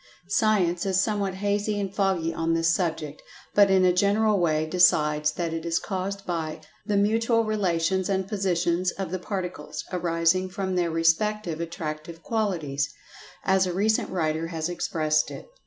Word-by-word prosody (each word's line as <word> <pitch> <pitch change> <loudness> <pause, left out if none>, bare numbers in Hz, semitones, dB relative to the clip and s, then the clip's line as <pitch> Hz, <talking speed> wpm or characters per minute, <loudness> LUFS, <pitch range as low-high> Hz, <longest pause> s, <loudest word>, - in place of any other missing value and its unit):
Science 195 -5 +2
is 190 -1 +2
somewhat 200 -2 0
hazy 205 +1 -1
and 195 -1 -3
foggy 190 -5 0
on 165 0 0
this 165 0 +2
subject, 160 -4 -2 0.3
but 205 -1 +6
in 190 -1 +4
a 180 - +4
general 205 +2 +2
way 155 -3 +1
decides 150 -3 +3
that 170 -2 -3
it 165 -1 -4
is 170 0 0
caused 195 0 -4
by 160 -3 -3 0.3
"the 205 -2 +1
mutual 225 +3 +2
relations 190 -3 0
and 190 -1 0
positions 180 -3 0
of 195 -3 -5
the 185 - -2
particles, 180 -5 -5
arising 175 +1 +1
from 190 0 -3
their 175 -1 +1
respective 165 +2 +1
attractive 165 -1 -6
qualities," 165 -11 -1 0.5
as 190 -1 +3
a 180 - -2
recent 215 +4 +1
writer 160 -2 -1
has 165 0 -3
expressed 155 -3 0
it. - - -9
180 Hz, 155 wpm, -26 LUFS, 165-200 Hz, 0.5 s, but